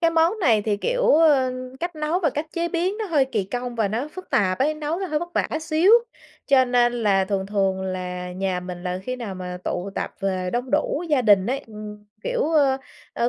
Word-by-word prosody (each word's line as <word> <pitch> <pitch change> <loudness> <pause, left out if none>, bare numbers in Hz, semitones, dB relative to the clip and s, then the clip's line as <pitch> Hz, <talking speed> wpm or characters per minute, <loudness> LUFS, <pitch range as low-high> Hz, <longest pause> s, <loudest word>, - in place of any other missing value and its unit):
cái 330 -1 +3
món 330 +6 +2
này 225 - +3
thì, 210 -1 0
kiểu, - - -1
ờ, 290 -5 +4 0.3
cách 345 -1 -3
nấu 305 +4 0
và 310 -6 +2
cách 295 +4 -3
chế 340 0 -1
biến 355 +4 0
nó 440 - -2
hơi 300 -6 +3
kỳ 225 -7 -2
công 245 +4 -4
và 220 -3 +1
nó 235 +8 -2
phức 370 - -10
tạp 185 -2 +2
ấy, 295 +4 +2
nấu 305 +1 -3
nó 385 - -2
hơi 305 -4 0
vất 345 - -5
vả - - +1
xíu, 320 +4 +3 0.6
cho 265 -2 +5
nên 245 -1 +3
là 205 -5 +2
thường 190 0 -2
thường 195 -2 0
là 180 -1 -4
nhà 185 0 -2
mình 180 -1 -7
là 180 0 -2
khi 255 +5 -4
nào 225 -6 -5
mà 180 -1 -6
tụ 180 +3 -3
tập - - -3
về 185 -2 -1
đông 245 +2 -2
đủ 300 +1 +1
gia 290 -5 +2
đình 200 -4 +5
ấy, 260 +3 0
ừm, 210 -1 -9 0.2
kiểu, - - -1
ờ, 285 -4 +4 0.4
ờ, 235 - +1
245 Hz, 230 wpm, -23 LUFS, 195-310 Hz, 0.6 s, cho